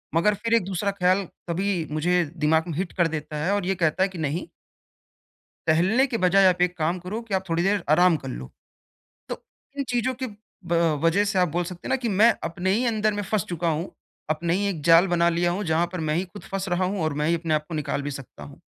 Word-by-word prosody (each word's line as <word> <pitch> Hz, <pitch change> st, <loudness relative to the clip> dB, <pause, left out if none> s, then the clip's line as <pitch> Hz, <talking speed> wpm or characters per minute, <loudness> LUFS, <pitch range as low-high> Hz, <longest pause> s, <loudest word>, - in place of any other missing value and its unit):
मगर 190 Hz, +6 st, +4 dB
फिर 230 Hz, +3 st, -2 dB
एक 230 Hz, -, +4 dB
दूसरा 195 Hz, +1 st, -1 dB
ख़्याल 190 Hz, 0 st, +2 dB, 0.2 s
तभी 180 Hz, -1 st, -1 dB
मुझे 175 Hz, +3 st, +2 dB
दिमाग 160 Hz, +1 st, +3 dB
में 160 Hz, -, -4 dB
हिट 185 Hz, 0 st, -2 dB
कर 175 Hz, -2 st, +2 dB
देता 150 Hz, -1 st, -5 dB
है 190 Hz, -, +1 dB
और 205 Hz, -3 st, 0 dB
ये 190 Hz, +1 st, 0 dB
कहता 170 Hz, +1 st, +1 dB
है 195 Hz, -, +1 dB
कि 185 Hz, -, -10 dB
नहीं 160 Hz, -, -2 dB, 1.2 s
टहलने 190 Hz, -, +3 dB
के 230 Hz, -3 st, -2 dB
बजाय 190 Hz, +2 st, +4 dB
आप 180 Hz, -1 st, +3 dB
एक 180 Hz, 0 st, +1 dB
काम 165 Hz, +4 st, 0 dB
करो 185 Hz, +6 st, -5 dB
कि 220 Hz, -4 st, -5 dB
आप 190 Hz, -, +1 dB
थोड़ी 165 Hz, +1 st, +1 dB
देर 195 Hz, 0 st, +1 dB
आराम 175 Hz, +1 st, +5 dB
कर -, -, -4 dB
लो। 65 Hz, +1 st, -7 dB, 0.8 s
तो -, -, -6 dB, 0.4 s
इन 280 Hz, -, 0 dB
चीज़ों 245 Hz, +1 st, 0 dB
की -, -, 0 dB, 0.4 s
ब 170 Hz, -, 0 dB, 0.3 s
वज़ह 165 Hz, +5 st, +3 dB
से 200 Hz, -1 st, 0 dB
आप 180 Hz, -2 st, +3 dB
बोल 175 Hz, +3 st, -1 dB
सकते 175 Hz, 0 st, -8 dB
हैं -, -, -4 dB
ना 265 Hz, -, +3 dB
कि 245 Hz, -3 st, -3 dB
मैं 215 Hz, +3 st, +5 dB
अपने 175 Hz, +3 st, -2 dB
ही 235 Hz, +5 st, +1 dB
अंदर 215 Hz, -2 st, +1 dB
में 205 Hz, -, -2 dB
फँस 205 Hz, -2 st, -1 dB
चुका 170 Hz, -1 st, -1 dB
हूँ। 160 Hz, +4 st, -2 dB, 0.4 s
अपने 165 Hz, +2 st, 0 dB
ही 200 Hz, +1 st, 0 dB
एक 165 Hz, -6 st, -4 dB
जाल 170 Hz, +3 st, +7 dB
बना 170 Hz, -1 st, +3 dB
लिया 175 Hz, +1 st, +1 dB
हूँ 195 Hz, +4 st, -2 dB
जहाँ 165 Hz, 0 st, +1 dB
पर 180 Hz, -, -4 dB
मैं 150 Hz, -, +1 dB
ही 180 Hz, +4 st, 0 dB
ख़ुद 185 Hz, +3 st, -12 dB
फँस 195 Hz, 0 st, -4 dB
रहा 175 Hz, +1 st, +1 dB
हूँ 190 Hz, +1 st, -2 dB
और 155 Hz, -, 0 dB
मैं 155 Hz, -, +1 dB
ही 170 Hz, -, +3 dB
अपने 160 Hz, -2 st, 0 dB
को 150 Hz, +2 st, -9 dB
निकाल 150 Hz, -1 st, -2 dB
भी 145 Hz, -, -3 dB
सकता 135 Hz, -2 st, -9 dB
हूँ। -, -, -12 dB
180 Hz, 250 wpm, -25 LUFS, 165-195 Hz, 1.2 s, जाल